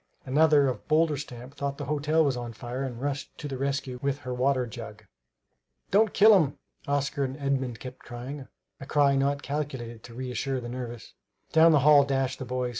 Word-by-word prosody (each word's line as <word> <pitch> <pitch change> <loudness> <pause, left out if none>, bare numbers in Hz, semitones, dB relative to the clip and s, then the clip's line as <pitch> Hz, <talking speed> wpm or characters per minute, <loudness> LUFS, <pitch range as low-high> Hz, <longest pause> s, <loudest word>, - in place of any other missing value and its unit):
Another 145 +1 +4
of 125 -5 -4
bolder 155 0 +3
stamp 125 -2 -8
thought 140 0 -3
the 145 - -5
hotel 150 +3 +2
was 135 -3 +1
on 120 -1 -5
fire 120 +3 -6
and 125 -4 -4
rushed 140 +1 -4
to 150 - -6
the 135 -2 -5
rescue 135 -2 -2
with 140 0 0
her 125 -2 -4
water 130 0 +1
jug. 110 -3 -9 0.9
"Don't 210 +2 +4
kill 215 +2 +7
him!" 145 0 -5 0.3
Oscar 140 0 0
and 130 0 -3
Edmund 135 -4 -1
kept 130 0 -9
crying, 130 +3 -8 0.3
a 135 - -9
cry 145 -2 +3
not 140 +1 0
calculated 130 -6 -4
to 115 - -12
reassure 130 +1 -3
the 120 -1 -7
nervous. 120 -2 -7 0.4
Down 160 +1 +6
the 150 -3 +4
hall 150 -2 +8
dashed 135 -2 -1
the 130 - -5
boys. 125 0 -2
135 Hz, 190 wpm, -27 LUFS, 125-145 Hz, 0.9 s, hall